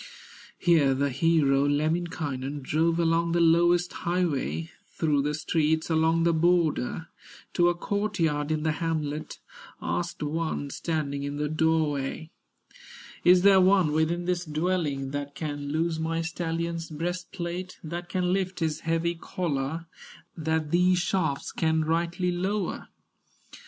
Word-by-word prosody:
Here 155 -6 +3
the 140 +1 0
hero, 140 -1 +3
Lemminkainen, 145 -3 -2
Drove 165 +4 +1
along 170 0 +2
the 170 - +2
lowest 170 +1 +4
highway, 170 -2 -1 0.2
Through 150 -3 0
the 150 +1 -1
streets 160 +1 0
along 160 +1 +3
the 170 0 +3
border, 165 -3 +1 0.4
To 175 0 +4
a 175 - 0
court 205 +3 -2
yard 150 -3 +1
in 155 -1 0
the 160 - +2
hamlet, 155 -2 -3 0.4
Asked 170 -2 -3
one 150 -2 -2
standing 145 -4 -2
in 140 0 -4
the 150 +1 -1
doorway: 155 -1 0 0.9
"Is 180 0 +6
there 195 -1 +7
one 185 -4 +4
within 160 +3 0
this 180 -1 0
dwelling, 155 -4 -1
That 145 0 -5
can 145 -1 -4
loose 160 +1 0
my 165 +1 -1
stallion's 165 0 -3
breastplate, 175 +2 -4
That 170 +2 -6
can 180 -1 0
lift 190 -1 -1
his 160 -2 -1
heavy 165 +1 0
collar, 165 -2 -3 0.5
That 160 -2 -1
these 180 +1 +4
shafts 175 -5 -1
can 160 -1 +1
rightly 170 +3 0
lower?" 190 +2 -2
165 Hz, 130 wpm, -27 LUFS, 150-175 Hz, 0.9 s, there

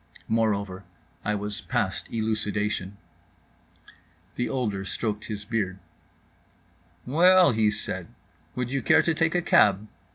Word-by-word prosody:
Moreover, 100 -4 0 0.4
I 105 +1 0
was 105 0 -4
past - - -2
elucidation. 105 -3 -2 1.4
The 120 - -2
older 105 -7 -2
stroked 105 +3 -3
his 105 -1 -6
beard. 100 -4 -2 1.3
"Well," 175 +4 +5
he 110 -2 +2
said, 95 -4 -4 0.5
"would 125 0 -3
you 135 0 -1
care 160 - +4
to 170 - +1
take 160 +1 +1
a 175 - +1
cab?" 105 - +4
110 Hz, 120 wpm, -26 LUFS, 100-125 Hz, 1.4 s, Well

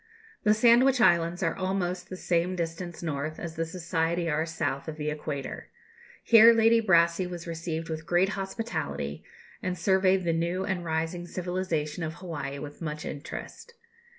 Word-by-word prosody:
The 210 0 +4
Sandwich 245 +4 +5
Islands 170 -2 +3
are 165 - +1
almost 185 -2 -2
the 185 - -6
same 175 +1 0
distance 170 0 -4
north 155 0 -3
as 165 -2 -6
the 165 0 -2
Society 165 0 -1
are 160 +1 0
south 145 -4 -3
of 160 - -4
the 150 0 -2
Equator. 150 -2 -5 0.6
Here 230 0 +8
Lady 225 0 +5
Brassey 170 -2 +3
was 175 -1 -7
received 165 -1 -4
with 160 0 -5
great 175 +3 +3
hospitality, 210 +3 -4 0.4
and 180 0 -2
surveyed 190 +1 +3
the 170 -1 +1
new 170 +3 -1
and 190 -3 -2
rising 165 +2 -2
civilization 180 -4 -2
of 160 0 -3
Hawaii 145 -7 -5
with 145 +2 -9
much 150 -1 -4
interest. 465 - -8
170 Hz, 155 wpm, -28 LUFS, 160-185 Hz, 0.6 s, Here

